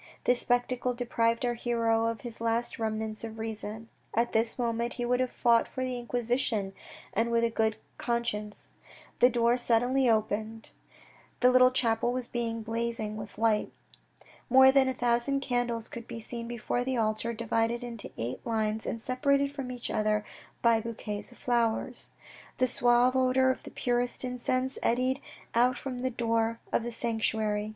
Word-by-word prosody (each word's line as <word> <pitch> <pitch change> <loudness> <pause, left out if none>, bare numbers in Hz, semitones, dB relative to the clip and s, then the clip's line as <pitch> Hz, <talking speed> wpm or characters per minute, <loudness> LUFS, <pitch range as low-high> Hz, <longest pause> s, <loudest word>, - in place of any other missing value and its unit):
This 245 0 +3
spectacle 245 0 0
deprived 235 0 0
our 240 - +1
hero 230 -1 +1
of 230 -2 -3
his 235 -2 -8
last 230 +1 -1
remnants 220 0 -3
of 225 -1 -6
reason. 220 0 -5 0.3
At 235 +1 +2
this 225 +1 +2
moment 235 -1 -1
he 245 - -3
would 250 +1 +1
have 255 -1 +1
fought 235 -2 +3
for 260 - -4
the 255 -1 -2
Inquisition, 240 -4 -1 0.4
and 225 +2 +1
with 235 0 +2
a 230 - +2
good 220 -1 +1 0.2
conscience. 225 -3 -3 0.5
The 245 - +7
door 240 0 +2
suddenly 245 +2 +2
opened. 220 0 -1 0.7
The 250 0 +6
little 255 0 +7
chapel 240 -2 +1
was 250 -1 -2
blazing 230 -1 -3
with 210 -1 -8
light. 220 -1 +1 0.8
More 265 +1 +8
than 270 -1 +4
a - - -1
thousand 245 +3 +1
candles 245 -3 -1
could 235 -1 -9
be 235 -1 -6
seen 235 +1 -6
before 240 +1 -2
the 260 0 -1
altar, 220 +1 0
divided 230 +1 -1
into 235 -3 -6
eight 120 +2 -4
lines 220 -1 -1
and 230 - -2
separated 280 +3 +1
from 275 -3 -5
each 245 -1 -5
other 215 0 +1 0.4
by 230 -1 +4
bouquets 215 -2 -5
of 245 - -16
flowers. 235 -2 -1 0.5
The 255 - +3
suave 245 +1 +4
odour 260 0 +4
of - - -5
the - - -9
purest 245 0 -1
incense 255 +1 -1
eddied 255 +3 +1 0.3
out 245 +2 +3
from 255 -2 -5
the 260 +1 0
door 230 -1 0
of - - +3
the 240 +1 -4
sanctuary. 220 -2 -1
235 Hz, 165 wpm, -29 LUFS, 225-245 Hz, 0.8 s, More